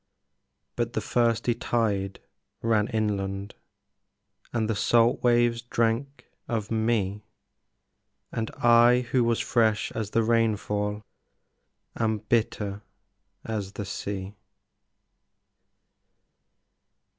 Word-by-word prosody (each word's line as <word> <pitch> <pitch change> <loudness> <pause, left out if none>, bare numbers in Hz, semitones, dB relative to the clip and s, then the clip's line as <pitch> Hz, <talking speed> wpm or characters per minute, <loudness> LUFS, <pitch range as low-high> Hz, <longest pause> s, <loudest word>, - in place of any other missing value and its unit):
But 120 0 -2
the - - 0
thirsty 115 +1 +1
tide 105 -5 -1 0.4
ran 110 -2 +2
inland, 100 -3 -2 1.0
And 110 -2 0
the 110 - 0
salt 115 +3 +3
waves 120 -1 +3
drank 120 +3 -1 0.2
of 110 -4 -3
me, 110 -3 0 1.1
And 110 -1 -2
I 120 +1 +6
who 125 -2 +3
was 115 -1 +1
fresh 110 -3 +1
as 110 -2 -3
the 115 +2 +2
rainfall 105 -2 0 0.9
Am 110 -1 0
bitter 105 -2 -1 0.6
as 105 -3 -4
the 105 - -5
sea. 100 0 -5
110 Hz, 90 wpm, -26 LUFS, 105-115 Hz, 1.1 s, I